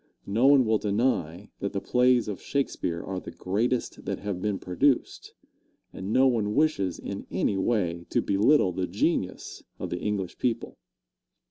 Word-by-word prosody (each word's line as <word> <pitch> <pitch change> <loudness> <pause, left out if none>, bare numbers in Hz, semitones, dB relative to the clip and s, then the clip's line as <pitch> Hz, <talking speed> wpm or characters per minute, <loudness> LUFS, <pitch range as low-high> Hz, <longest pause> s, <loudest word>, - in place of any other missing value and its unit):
No 115 +7 +2
one 140 -2 +6
will 110 -1 +2
deny 100 -4 -1
that 100 - -3
the 100 - -1
plays 125 +2 +3
of 105 -3 -5
Shakespeare 90 -11 -2
are 95 -1 -4
the - - -9
greatest 115 +6 -2
that - - -2
have 100 -3 -4
been 105 -1 -1
produced, 125 +10 0 0.6
and 95 +2 -5
no 130 +3 +5
one 110 -5 +1
wishes 140 - +1
in - - -6
any - - 0
way 90 -6 0
to - - +1
belittle 100 +2 +3
the 90 +1 -2
genius 95 - -2 0.2
of - - -5
the 90 - -2
English 100 -3 -3
people. 115 -2 -2
105 Hz, 160 wpm, -27 LUFS, 95-125 Hz, 0.6 s, one